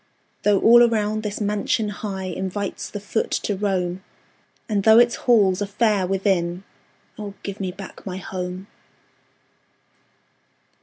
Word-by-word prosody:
Though 205 -2 +3
all 240 +1 +7
around 215 -2 +2
this 210 -1 -4
mansion 210 +1 0
high 205 -2 -5
Invites 190 +2 -4
the 205 - -6
foot 210 +2 -2
to 205 - -1
roam, 185 -2 -1 0.6
And 210 -2 0
though 220 +2 +6
its 240 0 +5
halls 205 -6 +3
are 205 - -1
fair 205 -2 +1
within 185 -2 0 0.6
Oh, 205 -2 -6
give 200 0 -6
me 190 -2 -2
back 190 +1 -11
my 185 -2 -5
HOME! 185 0 -5
200 Hz, 135 wpm, -22 LUFS, 190-210 Hz, 0.6 s, all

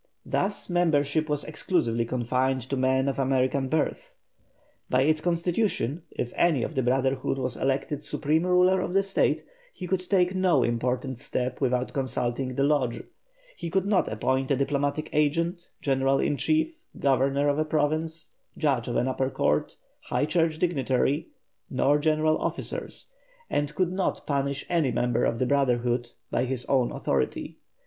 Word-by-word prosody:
Thus 200 +1 -1
membership 155 -3 +1
was 150 -1 0
exclusively 140 -7 0
confined 125 +2 0
to - - +1
men 130 +1 +2
of 140 0 -1
American 130 0 +1
birth. 155 +2 -1 0.7
By 130 +1 +3
its 155 +2 +2
constitution, 170 - 0
if 120 - -4
any 155 -8 +3
of - - -3
the 130 - +1
brotherhood 130 +1 +1
was 125 -2 -2
elected 135 +2 -1
supreme 155 +3 0
ruler 180 +1 +4
of 180 - -3
the 195 +1 +3
State, 195 0 +1 0.3
he 185 - -7
could 185 +1 0
take 185 -2 +3
no 185 -8 +3
important 125 +2 -1
step 125 +2 -3
without 125 -1 0
consulting 130 -1 -2
the 135 - +1
Lodge; 140 -5 +1 0.5
he 170 - -5
could 190 +2 +1
not 200 -2 +2
appoint 130 +4 0
a 140 - +3
diplomatic 140 +3 -1
agent, 165 +4 0
general 135 -1 +2
in 145 - +1
chief, 315 - 0 0.2
governor 140 +1 +2
of 145 +1 +1
a - - +3
province, 155 +1 -1 0.2
judge 140 -7 +1
of 120 - -2
an 125 - +1
upper 130 0 0
court, - - 0 0.3
high - - 0
church 165 -1 +1
dignitary, 140 -3 +1 0.4
nor 145 +2 +2
general 155 +1 +2
officers, - - -4 0.4
and 145 0 -1
could 180 +1 +1
not 185 0 -1
punish 140 -1 -1
any 165 -7 +1
member 120 0 +1
of 115 - 0
the 130 - +1
brotherhood, 125 -3 +1 0.2
by 125 - +1
his 125 -1 -3
own 130 -3 +2
authority. 65 -2 -2
140 Hz, 155 wpm, -27 LUFS, 130-160 Hz, 0.7 s, ruler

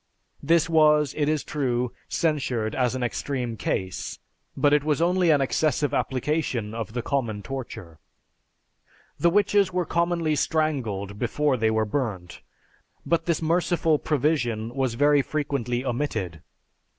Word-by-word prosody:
This 165 +2 +3
was, 150 -3 +4
it 150 -1 +1
is 155 -2 0
true, 125 -4 -1 0.2
censured 130 -9 0
as 125 -1 0
an 130 - -2
extreme 125 -1 -2
case, 95 -3 -3 0.4
but 145 0 +3
it 150 -1 +3
was 150 -1 +1
only 175 +1 +2
an 145 -3 +4
excessive 145 +1 +1
application 130 -5 -1
of 115 -2 -5
the 120 -1 -3
common 115 -8 -2
torture. 115 - -7 1.2
The 170 - +4
witches 200 +1 +3
were 180 -1 0
commonly 170 -2 0
strangled 120 - -1
before 140 +3 +1
they 110 -2 +1
were 110 0 +1
burnt, 105 -8 -3 0.6
but 170 0 0
this 170 -1 0
merciful 165 -1 +2
provision 120 -7 0
was 130 -3 -1
very 145 +2 +4
frequently 135 -4 -2
omitted. 110 - -2
140 Hz, 135 wpm, -25 LUFS, 115-155 Hz, 1.2 s, was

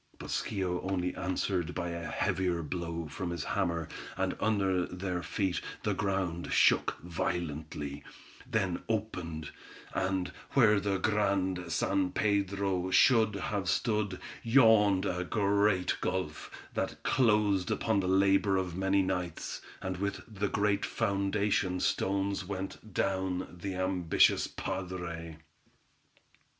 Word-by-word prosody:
But - - -9
Schio 95 -4 -1
only 90 -1 -1
answered 90 -1 -1
by 90 -1 -2
a 85 -1 -4
heavier 90 -3 0
blow 85 0 -4
from 90 +4 -4
his 85 -3 -3
hammer, 85 -5 -1 0.3
and - - 0
under 95 -4 +1
their 90 -1 -3
feet 95 -1 -1 0.2
the - - +1
ground 95 -4 -1
shook - - +4
violently, 80 -4 -3 0.5
then 95 -5 0
opened, 90 -8 -3 0.4
and, 95 -1 0 0.2
where 110 -6 +5
the 100 -1 0
Grand 95 -3 0
San 95 +3 +1
Pedro 100 -2 0
should 110 0 +5
have 100 -1 -2
stood, 105 -4 0 0.2
yawned 110 -5 +5
a 90 -2 -1
great 100 -1 +2
gulf, 90 -5 -2 0.2
that - - -3
closed 105 -6 +3
upon 110 -3 +1
the 95 - -1
labor 95 +1 +4
of 90 -3 -2
many 95 +1 +2
nights; 90 -3 -3 0.2
and 95 -1 -2
with 100 -1 -2
the 100 -2 -2
great 100 -1 +1
foundation 100 -1 0
stones 100 +1 0
went 95 +3 -6
down 95 -1 -1
the 95 0 -3
ambitious 95 -2 +3
padre. 85 -3 -5
95 Hz, 120 wpm, -31 LUFS, 90-100 Hz, 0.5 s, where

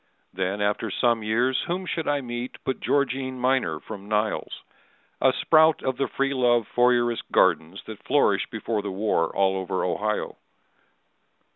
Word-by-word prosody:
Then 95 +2 -2
after 105 +2 0
some 115 +3 +1
years 120 +4 +1
whom 185 +2 -2
should 165 -3 -3
I 145 -1 +1
meet 120 0 -6
But 130 - -2
Georgine 130 -2 -1
Miner 130 +1 +1
from 100 0 -10
Niles—a 110 +4 -2
sprout 160 0 +4
Of 130 -1 -1
the 135 - 0
free 135 0 -1
love, 120 -3 +2
Fourierist 120 -1 +1
gardens 85 +5 +2
that 110 -2 -9
flourished 130 -8 +1
Before 110 -1 -3
the 100 - -5
war 95 -3 0
all 95 -1 +1
over 95 -1 -2
Ohio. 105 +4 -2
120 Hz, 145 wpm, -25 LUFS, 105-130 Hz, -, sprout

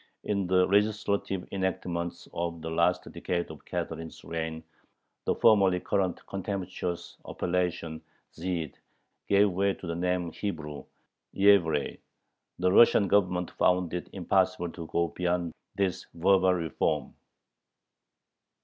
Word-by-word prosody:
In 100 -3 -1
the 90 0 +4
legislative 100 -2 +1
enactments 90 -3 -3
of 85 -1 -3
the 80 - -4
last 85 +2 +2
decade 85 -2 -2
of 75 - -12
Catherine's 80 0 -5
reign 80 -1 -4 0.6
the - - +1
formerly 100 -5 +5
current 95 -1 -1
contemptuous 95 -2 -4
appellation 85 -3 -2 0.3
"Zhyd" 85 -3 -3 0.6
gave 100 0 +5
way 95 +2 +1
to - - -10
the 85 - -2
name 90 0 -1
"Hebrew" 75 -8 -5 0.5
(Yevrey). 95 -7 +4 0.6
The 90 +1 +2
Russian 100 -1 +6
Government 90 -2 +2
found 90 -2 +2
it 90 - -4
impossible 95 -2 +1
to 85 -2 -8
go 85 +1 0
beyond 90 -2 -1 0.2
this 95 -3 -1
verbal 95 +1 +4
reform. 85 -3 -1
90 Hz, 115 wpm, -29 LUFS, 85-95 Hz, 0.6 s, Russian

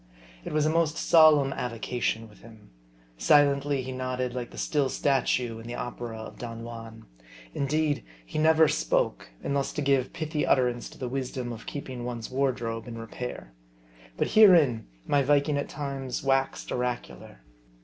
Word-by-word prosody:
It - - -6
was 150 0 +2
a - - +3
most 165 -1 +1
solemn 150 -4 +5
avocation 115 -1 -2
with 105 -2 -19
him. 110 - -16 0.5
Silently 140 - +3
he 130 - -5
nodded 130 -1 -3
like 125 -1 -4
the - - -13
still 145 -3 0
statue 125 -5 0
in 115 - -10
the 120 - -5
opera 120 -2 -5
of 110 - -9
Don 115 -1 -6
Juan. 115 -1 -9 0.5
In 140 - -1
deed 150 0 0 0.2
he 105 - -4
never 160 0 +5
spoke, 150 - 0
unless 140 -1 -1
to 150 - -2
give 135 -2 +2
pithy 155 -1 -2
utterance 125 -2 +1
to - - -15
the 130 - -4
wisdom 125 -1 -3
of 115 0 -11
keeping 130 -4 -6
one's 120 -1 -5
wardrobe 125 -4 -1
in 115 -1 -7
repair. 115 - -7 0.6
But - - 0
herein 165 - +6 0.2
my 145 - +3
Viking 145 +2 +2
at - - -4
times 135 -4 -4
waxed 135 0 0
oracular. 125 - -4
130 Hz, 160 wpm, -27 LUFS, 120-145 Hz, 0.6 s, herein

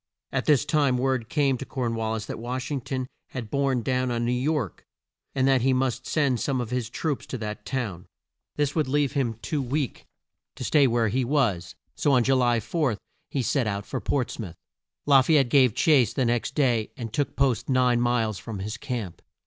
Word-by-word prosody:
At - - -1
this 145 -2 +4
time 145 -4 +2
word 130 -2 0
came 140 -4 +1
to - - -4
Corn 125 -3 -3
wal 110 -1 -1
lis 110 -1 -4
that - - -6
Wash 125 +3 -4
ing 140 -3 -1
ton 130 +1 -3 0.2
had 120 -5 -7
borne 135 -3 +1
down 130 0 0
on 120 -1 -1
New 120 - +1
York 125 - -1 0.5
and 130 -1 +2
that 135 -2 +4
he 130 +2 +3
must 130 -1 -1
send 140 -6 +1
some 135 -3 -1
of 120 -1 -4
his 125 -2 -2
troops 145 +3 -3
to 130 - -4
that 105 -1 -6
town. 105 -10 -3 0.5
This 145 -1 0
would 155 -4 0
leave 145 0 +1
him 130 -6 -1
too 150 -3 -1
weak 135 0 -3 0.5
to - - -6
stay 140 +2 +4
where 115 -2 +2
he 130 +5 0
was, 120 - 0 0.2
so 145 - +1
on 125 -2 +4
Ju 135 - +3
ly 120 -2 +3
4 135 -4 -1 0.3
he 135 - -1
set 125 0 +1
out 100 -1 -3
for - - -4
Ports 125 -4 -1
mouth. 95 -7 -6 0.5
La 140 -2 +7
fay 155 +4 +4
ette 135 -4 +3
gave 130 -5 +4
chase 135 -9 +4
the 130 - +1
next 120 0 -1
day 120 -7 +2
and 115 -3 -6
took 145 +1 -1
post 135 -4 +1
nine 125 -2 +3
miles 115 -4 +1
from 110 -3 -6
his 105 +3 -4
camp. 120 -9 -5
125 Hz, 215 wpm, -26 LUFS, 115-140 Hz, 0.5 s, La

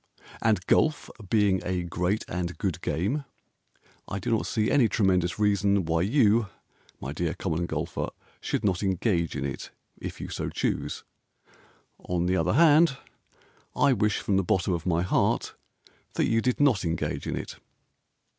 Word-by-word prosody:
And 105 -6 +2
golf 155 -1 +2 0.2
being 100 -4 +3
a 90 -1 -1
great 90 +4 -1
and 90 -1 -3
good - - -2
game 100 - -1 0.8
I 95 - -4
do 100 - -3
not 110 - +1
see 110 -1 0
any 130 -6 +4
tremendous 90 -4 +1
reason 100 -2 +2
Why 80 0 +1
you, 110 0 +3 0.5
my 70 +3 -5
dear 85 +1 -2
Common 85 -1 -2
Golfer, - - -3 0.3
Should - - -2
not 95 -4 +1
engage 95 -4 0
in 70 -1 -2
it 70 - -5 0.3
if - - -7
you - - -5
so - - -3
choose. - - -2 1.0
On 90 -1 -2
the 90 +1 +2
other - - +1
hand, 155 0 +5 0.8
I 140 - +4
wish 105 -4 +1
from 100 - 0
the 95 - +2
bottom 95 -1 +1
of 85 0 -3
my 85 -1 +2
heart 90 - +1 0.6
That - - +2
you 115 0 +2
did 125 +1 0
not 135 -9 +3
engage 85 -2 -2
in - - -2
it. - - -6
95 Hz, 160 wpm, -27 LUFS, 85-110 Hz, 1.0 s, hand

